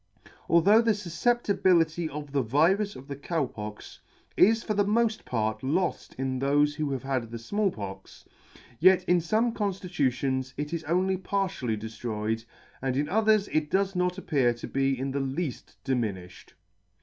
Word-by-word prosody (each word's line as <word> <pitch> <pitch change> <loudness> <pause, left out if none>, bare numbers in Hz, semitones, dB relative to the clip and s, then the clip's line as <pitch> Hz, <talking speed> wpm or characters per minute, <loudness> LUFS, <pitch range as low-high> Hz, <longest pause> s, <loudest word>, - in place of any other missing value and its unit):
Although 195 +7 +6
the 230 -1 +3
fufeeptibility 175 -4 +1
of 145 -1 -7
the 140 -1 +1
virus 170 - +2
of 130 - -11
the 140 - -5
Cow 150 +2 -1
Pox 105 -3 -9 0.4
is 225 +3 +4
for 215 - -1
the 205 0 +2
molt 220 +2 +1
part 110 -2 -1
loft 170 +8 -1
in 130 0 -2
thofe 145 +2 +2
who 150 -1 -2
have 135 -2 -3
had 130 -4 -2
the 115 - -6
Small 205 - 0
Pox, 95 - -9 0.5
yet 185 +1 +6
in 180 -1 +3
fome 220 +8 +1
conftitutions 140 - -1
it 150 +2 -4
is 165 -1 -3
only 185 +4 +1
partially 190 - -2
deflroyed, 110 0 -3 0.4
and 130 -1 -1
in 145 +1 0
others 215 0 +3
it 155 -1 0
does 195 +1 +1
not 180 0 0
appear 135 -10 +1
to 120 - -8
be 135 0 0
in 135 +1 -2
the 140 - -1
leafl 135 +2 -4
diminiffied. 105 -9 -3
150 Hz, 160 wpm, -27 LUFS, 130-190 Hz, 0.5 s, Although